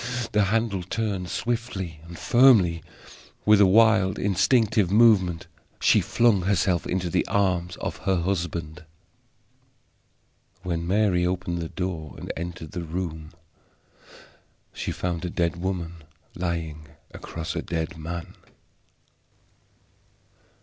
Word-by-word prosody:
The 105 -1 +3
handle 110 -1 0
turned, 95 -1 -3
swiftly 110 -9 -3
and 85 0 -10
firmly. 110 -10 +5 0.6
With 105 -1 +6
a 100 - +7
wild 110 -1 +4
instinctive 105 +1 +2
movement 100 -5 +4 0.3
she - - +4
flung 115 -5 +2
herself 90 -2 +1
into 90 -1 -1
the 85 - +1
arms 90 -3 0
of - - -5
her 95 - 0
husband. 85 -2 -3 1.8
When 85 -2 -3
Mary 95 -2 +2
opened 90 -1 -2
the 80 -1 -4
door 85 -6 -5
and - - -6
entered 85 -2 -6
the 90 - -4
room 80 -2 -5 1.4
she - - -4
found 85 -2 -3
a 90 - -2
dead 85 0 -1
woman 85 -2 -3 0.4
lying 80 -3 -4 0.3
across 80 0 -6
a - - -1
dead 85 +2 -3
man. 85 +3 -6
90 Hz, 115 wpm, -25 LUFS, 85-100 Hz, 1.8 s, a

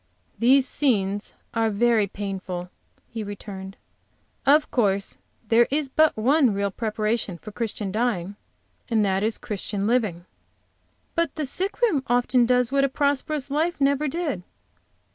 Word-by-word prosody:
"These 260 +3 +5
scenes 205 -7 0 0.2
are 225 -1 +2
very 220 0 +2
painful," 190 -3 -5 0.4
he 225 -2 -5
returned. 195 -1 -8 0.7
"Of 300 +2 +5
course 200 -5 0 0.3
there 235 +1 +5
is 290 0 0
but 310 0 +3
one 255 0 +3
real 200 0 0
preparation 215 -2 -2
for 215 - -10
Christian 210 -3 -3
dying, 205 -4 -1 0.5
and 220 -3 +2
that 190 0 +1
is 220 +1 0
Christian 205 -1 -3
living." 210 -7 0 0.9
"But 335 -3 0
the 310 - -2
sick 390 - -3
room 420 - +3
often 245 0 +3
does 250 0 +2
what 275 0 +3
a 275 - +2
prosperous 285 +1 -1
life 320 +3 0
never 280 +2 +2
did!" 295 - -2
230 Hz, 140 wpm, -24 LUFS, 200-275 Hz, 0.9 s, These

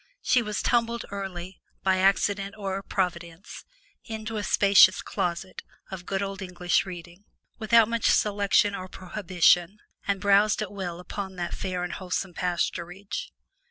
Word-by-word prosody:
She 250 - +3
was 210 -2 -3
tumbled 235 -1 +1
early, 190 -2 -6 0.2
by 190 -1 +2
accident 195 +1 +1
or 195 -1 -3
providence, 175 -1 -4 0.4
into 220 -1 -5
a 205 - -2
spacious 200 -1 +6
closet 185 -1 -3 0.3
of 180 -2 -8
good 195 0 -1
old 195 -1 -5
English 180 0 0
reading, 175 +2 -10 0.3
without 225 0 +5
much 230 -1 +1
selection 205 0 +3
or 185 -1 -5
prohibition, 185 -1 +1 0.3
and 200 -1 0
browsed 205 +2 +3
at 205 - -7
will 180 -4 -5
upon 190 +1 -6
that 175 -1 -4
fair 180 -1 -3
and 180 - -4
wholesome 185 0 -3
pasturage. 180 - -3
195 Hz, 140 wpm, -26 LUFS, 180-205 Hz, 0.4 s, spacious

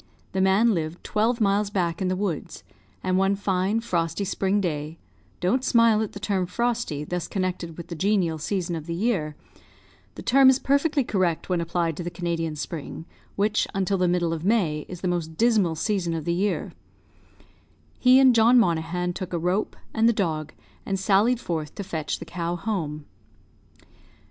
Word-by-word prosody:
The 190 - 0
man 200 +5 +4
lived 165 -1 -3
twelve 230 +3 0
miles 205 -1 +2
back 175 -3 -1
in 185 - +1
the 185 - 0
woods; 185 -5 -4 0.4
and 185 0 +1
one 195 +1 +2
fine, 195 +2 0
frosty 175 -2 -1
spring 195 +1 0
day 155 -3 -3 0.4
(don't 215 +9 +1
smile 230 -4 +4
at 220 - -3
the 200 - -7
term 195 -3 -1
frosty, 235 -7 -1
thus 175 +2 -3
connected 180 -4 -3
with 170 - -8
the - - -4
genial 185 -3 +1
season 175 +1 -2
of 160 0 -7
the 170 - -3
year; 175 -7 -1 0.8
the - - -8
term 270 0 +6
is 260 - +5
perfectly 280 +1 +1
correct 185 -8 -1
when 180 -2 +1
applied 170 -1 -1
to 175 - -4
the 175 - -3
Canadian 170 -2 -3
spring, 160 +1 -6 0.3
which, 210 +1 +1
until 195 0 0
the 180 - +3
middle 175 -1 +1
of 160 -1 -5
May, 175 -8 +1
is 180 -2 -8
the 185 - -1
most 165 -3 -2
dismal 215 -8 +3
season 175 -1 -1
of 160 -2 -4
the 170 - +1
year) 195 +4 -1 1.3
he 255 0 +6
and 260 -2 +6
John 230 +2 +5
Monaghan 180 -3 +1
took 185 0 -6
a - - +1
rope, 180 +5 -1 0.2
and 225 +1 +4
the - - +3
dog, 155 -7 -2 0.3
and 195 -1 -2
sallied 205 +5 +3
forth 160 -8 -4
to 200 - -4
fetch 160 -5 -3
the 165 - -9
cow 170 +1 -3
home. 165 -7 -3
185 Hz, 180 wpm, -25 LUFS, 165-210 Hz, 1.3 s, term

